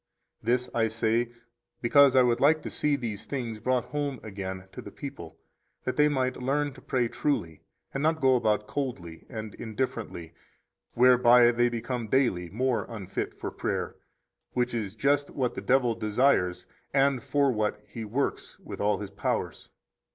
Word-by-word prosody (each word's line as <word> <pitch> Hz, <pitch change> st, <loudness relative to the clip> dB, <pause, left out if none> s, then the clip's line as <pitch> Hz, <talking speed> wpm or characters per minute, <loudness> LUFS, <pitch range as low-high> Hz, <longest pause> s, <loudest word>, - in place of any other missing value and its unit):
29 -, -, +1 dB
This 125 Hz, 0 st, -5 dB
I 115 Hz, -1 st, +2 dB
say 115 Hz, +2 st, 0 dB, 0.5 s
because 135 Hz, +2 st, +5 dB
I 130 Hz, -, +7 dB
would 120 Hz, -1 st, +2 dB
like 155 Hz, +2 st, +4 dB
to -, -, -5 dB
see 150 Hz, -1 st, +1 dB
these 115 Hz, -7 st, -5 dB
things 120 Hz, -6 st, -4 dB
brought 125 Hz, +2 st, 0 dB
home 145 Hz, -2 st, -3 dB
again 95 Hz, -3 st, -6 dB
to -, -, -8 dB
the -, -, -9 dB
people -, -, -9 dB, 0.5 s
that 130 Hz, -, -2 dB
they 150 Hz, 0 st, +5 dB
might 130 Hz, -3 st, 0 dB
learn 145 Hz, +2 st, 0 dB
to 130 Hz, -, -14 dB
pray 125 Hz, -2 st, 0 dB
truly, 85 Hz, -, -2 dB, 0.3 s
and 135 Hz, -, -2 dB
not 160 Hz, +1 st, +2 dB
go 130 Hz, -2 st, +4 dB
about 105 Hz, -3 st, +1 dB
coldly 100 Hz, -, -5 dB
and 110 Hz, -4 st, -6 dB
indifferently, 110 Hz, -8 st, -4 dB, 0.6 s
whereby 125 Hz, -1 st, +6 dB
they 120 Hz, 0 st, +2 dB
become 120 Hz, 0 st, -3 dB
daily 105 Hz, -9 st, +1 dB
more 125 Hz, +4 st, 0 dB
unfit 105 Hz, -6 st, -4 dB
for -, -, -4 dB
prayer; -, -, -3 dB, 0.6 s
which 125 Hz, 0 st, 0 dB
is 110 Hz, -4 st, -3 dB
just 140 Hz, +4 st, +1 dB
what 130 Hz, -3 st, -1 dB
the -, -, -5 dB
devil 125 Hz, -2 st, +3 dB
desires, 110 Hz, -4 st, +1 dB, 0.3 s
and 135 Hz, -2 st, +3 dB
for 140 Hz, +3 st, +2 dB
what 105 Hz, -2 st, -1 dB
he 115 Hz, -, -7 dB
works 125 Hz, +6 st, -2 dB
with -, -, -8 dB
all 105 Hz, +1 st, +2 dB
his 100 Hz, -2 st, -7 dB
powers. 100 Hz, 0 st, -3 dB
120 Hz, 165 wpm, -28 LUFS, 110-135 Hz, 0.6 s, I